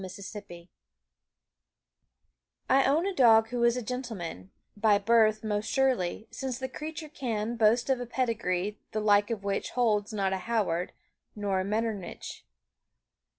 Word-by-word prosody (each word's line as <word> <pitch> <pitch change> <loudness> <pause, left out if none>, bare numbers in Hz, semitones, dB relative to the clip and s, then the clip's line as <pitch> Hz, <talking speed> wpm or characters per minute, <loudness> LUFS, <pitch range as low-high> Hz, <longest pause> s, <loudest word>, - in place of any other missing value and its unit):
MY 190 - -6
GENTLEMAN 185 -2 -9 2.0
I 270 +1 +4
own 300 +6 +2
a 395 - -1
dog 225 -7 +5
who 245 0 -1
is 235 +1 +4
a 250 - -3
gentleman; 215 - -5 0.3
By 210 -1 +4
birth 215 0 +3
most 210 0 -2
surely, 245 -7 0
since 260 -3 -4
the 260 0 -4
creature 310 +4 -7
can 235 -6 -3
Boast 230 +2 +3
of 265 -2 +1
a 245 - -5
pedigree 210 -6 -1
the 215 - 0
like 205 -1 +3
of 220 -4 -3
which 200 0 -2
Holds 210 -4 +2
not 195 -3 0
a - - 0
Howard 185 -6 0 0.4
nor 200 -2 -1
a - - 0
Metternich. 210 -1 -4
220 Hz, 150 wpm, -29 LUFS, 200-245 Hz, 2.0 s, dog